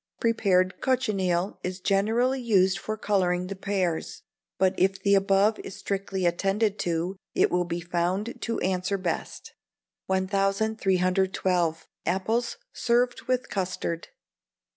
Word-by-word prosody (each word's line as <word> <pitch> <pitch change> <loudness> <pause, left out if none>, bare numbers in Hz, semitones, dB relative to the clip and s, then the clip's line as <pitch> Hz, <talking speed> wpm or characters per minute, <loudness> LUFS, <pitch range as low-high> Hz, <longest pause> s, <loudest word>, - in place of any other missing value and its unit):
Prepared 195 -5 +2
cochineal 195 -8 0
is 180 +1 -3
generally 225 +7 +1
used 190 -5 +3
for 215 +3 -4
colouring 180 -4 +1
the 195 +2 -5
pears; 190 -4 -2 0.3
but 190 -1 +3
if 195 +1 +1
the 200 - +4
above 195 +2 +3
is 195 - -8
strictly 195 -2 -2
attended 195 +4 +1
to, 175 +2 -1 0.2
it - - +3
will 180 0 +1
be 170 0 -3
found 180 +6 -2
to 230 - -2
answer 190 +2 0
best. 180 -3 -4 0.5
1312. 190 -3 +1 0.2
Apples 215 +7 0 0.2
served 245 +1 +1
with 255 0 0
Custard. 180 -3 -3
195 Hz, 120 wpm, -27 LUFS, 180-210 Hz, 0.5 s, the